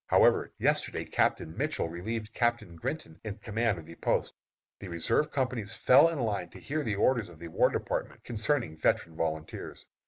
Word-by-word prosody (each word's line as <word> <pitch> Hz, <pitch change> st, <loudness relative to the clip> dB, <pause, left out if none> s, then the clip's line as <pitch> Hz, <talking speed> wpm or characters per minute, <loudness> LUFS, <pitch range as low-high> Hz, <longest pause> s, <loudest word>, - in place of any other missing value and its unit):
However, -, -, +4 dB
yesterday -, -, +1 dB
Captain 80 Hz, -, 0 dB
Mitchell -, -, -1 dB
relieved 110 Hz, +6 st, -4 dB
Captain 120 Hz, -8 st, 0 dB
Grinton 80 Hz, 0 st, -5 dB
in 110 Hz, -2 st, -5 dB
command 110 Hz, -1 st, 0 dB
of 80 Hz, -, -9 dB
the 85 Hz, -, -10 dB
post. -, -, 0 dB, 0.5 s
The 100 Hz, -, -7 dB
reserve 90 Hz, -, +1 dB
companies 125 Hz, -6 st, -1 dB
fell 140 Hz, +6 st, +6 dB
in 165 Hz, -, -3 dB
line 100 Hz, -7 st, -1 dB
to -, -, -12 dB
hear 155 Hz, +2 st, -2 dB
the 110 Hz, -6 st, -1 dB
orders 115 Hz, 0 st, +2 dB
of 85 Hz, -, -13 dB
the 85 Hz, +1 st, -8 dB
War -, -, +4 dB
Department, -, -, -3 dB
concerning 115 Hz, -, 0 dB
veteran 80 Hz, +1 st, +1 dB
volunteers. 80 Hz, -1 st, -4 dB
105 Hz, 175 wpm, -30 LUFS, 85-120 Hz, 0.5 s, fell